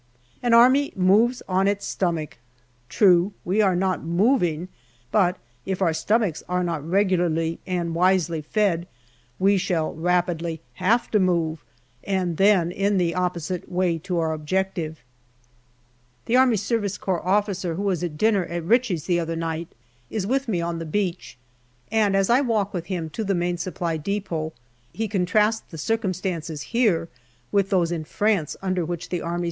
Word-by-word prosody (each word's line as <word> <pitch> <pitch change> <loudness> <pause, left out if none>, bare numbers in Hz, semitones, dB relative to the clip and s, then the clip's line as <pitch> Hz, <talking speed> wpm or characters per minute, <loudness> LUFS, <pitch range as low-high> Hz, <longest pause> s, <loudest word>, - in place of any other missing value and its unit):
" 125 - -35
An 240 -1 +3
army 260 +4 +5
moves 210 +7 +3
on 190 +1 +2
its 200 0 0
stomach." 165 -8 -2 0.5
True, 185 -1 +4
we 195 +5 +2
are 190 -3 +3
not 185 +1 0
moving; 175 - +1 0.4
but 185 -4 +3 0.3
if 190 -1 -3
our 175 -4 +2
stomachs 210 -1 0
are 180 0 0
not 165 -4 -2
regularly 170 -2 +1
and 175 -2 -2
wisely 175 -2 +2
fed, 175 0 0 0.5
we 195 +1 +3
shall 175 -5 -1
rapidly 170 -1 0 0.2
have 230 +6 +2
to 210 - +3
move, 170 -4 0 0.4
and 185 -4 -1
then 195 -4 +4
in 200 +2 +1
the 170 -2 +1
opposite 180 0 -3
way 175 -2 +1
to 180 +2 -3
our 160 -1 0
objective. 160 0 -2 1.2
The 230 - -2
A.S.C. 230 -4 +3 0.2
officer 185 -1 0
who 195 - -3
was 185 -4 0
at 160 -4 -4
dinner 205 -1 +2
at 170 -1 -4
Ritchie's 220 - +2
the 175 -2 +1
other 165 0 -2
night 165 0 -3 0.4
is 210 -4 -2
with 265 +5 0
me 185 -6 0
on 170 0 -3
the 165 - -5
beach, 180 -4 -3 0.5
and, 215 -3 +2
as 195 -1 +3
I 245 +3 +4
walk 220 -6 0
with 175 -2 -4
him 170 -5 -3
to 220 - -3
the 200 -1 0
Main 175 0 -1
Supply 170 -2 -2
depot, 165 -2 -3 0.4
he 225 0 -3
contrasts 210 +3 +2
the 165 - -9
circum 200 +3 -1
stances 165 -5 -4
here 215 -9 +2 0.4
with 200 -1 +2
those 175 -4 +2
in 165 -2 -2
France 200 -2 0
under 185 -2 0
which 170 +1 -5
the 175 - -2
A.S. 170 +1 -3
180 Hz, 165 wpm, -24 LUFS, 170-200 Hz, 1.2 s, army